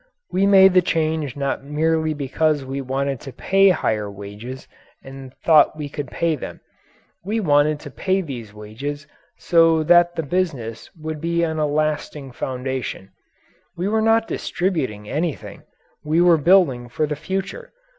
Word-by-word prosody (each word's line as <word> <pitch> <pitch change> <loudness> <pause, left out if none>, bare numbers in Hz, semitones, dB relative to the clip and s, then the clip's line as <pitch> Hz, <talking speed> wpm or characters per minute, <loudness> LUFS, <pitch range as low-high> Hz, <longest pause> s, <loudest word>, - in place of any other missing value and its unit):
We 195 +2 +2
made 190 -1 +7
the 185 - +6
change 160 -5 -1
not 140 -1 -2
merely 155 +2 0
because 145 +1 0
we 135 +1 -4
wanted 135 0 -2
to 135 - -9
pay 195 +7 +3
higher 110 - 0
wages 105 +6 -9 0.4
and 135 -1 -10
thought 155 -1 +5
we 150 -2 -5
could 145 -1 -5
pay 165 +4 -1
them. 140 - -8 0.6
We 215 +5 -1
wanted 150 -4 +2
to 145 - -9
pay 190 +6 0
these 125 - -7
wages 120 +8 -7 0.3
so 165 -2 +3
that 175 +1 +4
the 165 - -2
business 140 -9 -3
would 155 -1 -5
be 170 0 0
on 160 -1 -3
a 150 - +1
lasting 150 -2 -2
foundation. 130 -5 -5 0.7
We 180 +3 -1
were 220 +1 +1
not 225 +1 +3
distributing 130 - -2
anything 155 +3 -4 0.4
we 155 +2 +1
were 175 -1 +5
building 150 -7 +3
for 125 +6 -1
the 150 0 -3
future. 190 - -5
150 Hz, 155 wpm, -21 LUFS, 135-170 Hz, 0.7 s, made